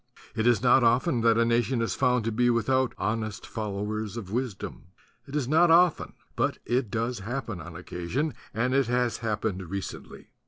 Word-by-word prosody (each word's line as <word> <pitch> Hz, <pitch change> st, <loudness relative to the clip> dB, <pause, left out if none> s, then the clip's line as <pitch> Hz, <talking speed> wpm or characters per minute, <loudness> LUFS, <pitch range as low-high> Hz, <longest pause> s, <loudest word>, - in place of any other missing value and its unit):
It 110 Hz, +1 st, +1 dB
is 120 Hz, -2 st, +3 dB
not 125 Hz, +1 st, +5 dB
often 120 Hz, +3 st, +3 dB
that 115 Hz, 0 st, +4 dB
a 115 Hz, -, +4 dB
nation 120 Hz, +2 st, +1 dB
is 115 Hz, -, 0 dB
found 125 Hz, -3 st, +2 dB
to 115 Hz, -, 0 dB
be 120 Hz, +3 st, +2 dB
without 130 Hz, +2 st, +1 dB
"hon 110 Hz, +3 st, -1 dB
est 110 Hz, -2 st, -7 dB
followers 105 Hz, 0 st, -4 dB
of 100 Hz, -5 st, -7 dB
wisdom." 120 Hz, -7 st, -4 dB, 0.4 s
It 140 Hz, -, -7 dB
is 145 Hz, -5 st, 0 dB
not 160 Hz, +4 st, +4 dB
often 170 Hz, 0 st, +4 dB, 0.2 s
but -, -, 0 dB
it 120 Hz, -1 st, 0 dB
does 115 Hz, +1 st, -2 dB
happen 115 Hz, -3 st, -4 dB
on 85 Hz, 0 st, -9 dB
occasion; 90 Hz, -, -3 dB, 0.2 s
and 120 Hz, +4 st, 0 dB
it 135 Hz, -2 st, +3 dB
has 125 Hz, -1 st, +1 dB
happened 105 Hz, -5 st, -3 dB
recently. 100 Hz, 0 st, -7 dB
115 Hz, 185 wpm, -27 LUFS, 105-125 Hz, 0.4 s, not